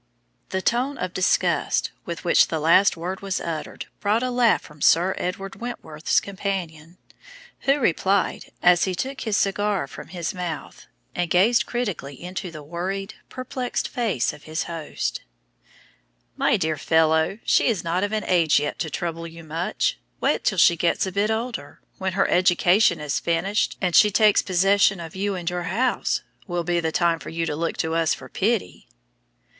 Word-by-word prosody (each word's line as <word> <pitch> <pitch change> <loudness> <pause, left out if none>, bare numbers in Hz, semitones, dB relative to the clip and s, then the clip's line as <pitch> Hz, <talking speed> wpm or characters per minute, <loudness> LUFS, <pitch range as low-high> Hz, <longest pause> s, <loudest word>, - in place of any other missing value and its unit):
The 190 0 -2
tone 255 +4 0
of 185 -4 -4
disgust 185 - +1
with 170 -1 -6
which 170 - +5
the 160 - -2
last 170 +5 +4
word 180 +3 -4
was 195 -1 -2
uttered 160 -2 -5
brought 215 +4 +1
a 255 - -1
laugh 245 -2 +3
from 150 -1 -15
Sir 180 +3 +4
Edward 195 +2 -4
Wentworth's 165 -10 -1
companion, 180 -4 -5 0.6
who 275 +1 +2
replied, 195 - 0
as 175 -1 +5
he 185 -1 -2
took 265 +8 -4
his 220 -3 0
cigar 200 -3 0
from 135 - -10
his 175 -2 -4
mouth 175 -4 -6 0.3
and 175 -1 -1
gazed 205 +9 +3
critically 190 - -4
into 180 +1 -5
the 155 -3 -10
worried, 190 +6 -4 0.2
perplexed 255 0 -3
face 225 - -1
of 150 - -14
his 155 +1 -2
host 165 -3 -4 1.1
"My - - +2
dear 160 -4 -1
fellow, 160 +3 +2
she - - +3
is 225 -7 0
not 175 +3 0
of 205 - -1
an 215 -1 -1
age 170 -4 +3
yet 145 - -3
to 160 - -2
trouble 165 +1 -4
you 165 0 -11
much. 160 +3 -2 0.2
Wait - - +1
till 195 - +1
she 170 0 +6
gets 170 +3 +1
a 190 - -4
bit 200 +3 0
older. 220 -9 -4 0.2
When 190 -1 -2
her 195 - +2
education 180 0 +3
is 150 -1 -1
finished, 175 +5 0
and 180 -3 0
she 210 - +7
takes 210 0 +4
possession 195 +1 +3
of 165 0 -8
you 200 +1 -1
and 175 -2 -6
your 175 0 -2
house, 250 +5 0 0.3
will 175 -2 -2
be 175 +1 0
the 160 -1 -1
time 170 0 +2
for - - -8
you 165 0 -2
to 150 - -2
look 165 +2 -2
to 160 0 -1
us 165 -1 +2
for 130 - -12
pity!" 220 +1 -1
180 Hz, 175 wpm, -24 LUFS, 165-200 Hz, 1.1 s, she